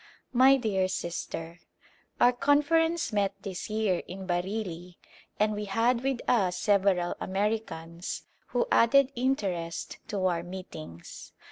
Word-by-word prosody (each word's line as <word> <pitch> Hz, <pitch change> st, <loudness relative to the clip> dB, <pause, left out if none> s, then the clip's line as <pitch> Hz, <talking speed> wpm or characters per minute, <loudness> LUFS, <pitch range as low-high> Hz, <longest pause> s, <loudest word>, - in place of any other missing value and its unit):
My 260 Hz, +2 st, +7 dB
dear 200 Hz, -7 st, +1 dB
Sister: 170 Hz, -2 st, -5 dB, 0.6 s
Our 245 Hz, -, +6 dB
Conference 295 Hz, +3 st, +2 dB
met 200 Hz, -1 st, +1 dB
this 190 Hz, 0 st, -5 dB
year 215 Hz, -4 st, +1 dB
in 190 Hz, +1 st, -7 dB
Bareilly 180 Hz, -1 st, -3 dB, 0.4 s
and 215 Hz, 0 st, +3 dB
we 210 Hz, 0 st, -3 dB
had 230 Hz, +4 st, +2 dB
with 265 Hz, -2 st, -1 dB
us 190 Hz, -7 st, +2 dB
several 195 Hz, -4 st, +2 dB
Americans, 190 Hz, -4 st, -3 dB, 0.2 s
who 485 Hz, -, 0 dB
added 275 Hz, +3 st, +5 dB
interest 195 Hz, -10 st, -2 dB
to 195 Hz, -3 st, -2 dB
our 175 Hz, -2 st, +1 dB
meetings. 170 Hz, -, -9 dB
200 Hz, 120 wpm, -28 LUFS, 180-240 Hz, 0.6 s, My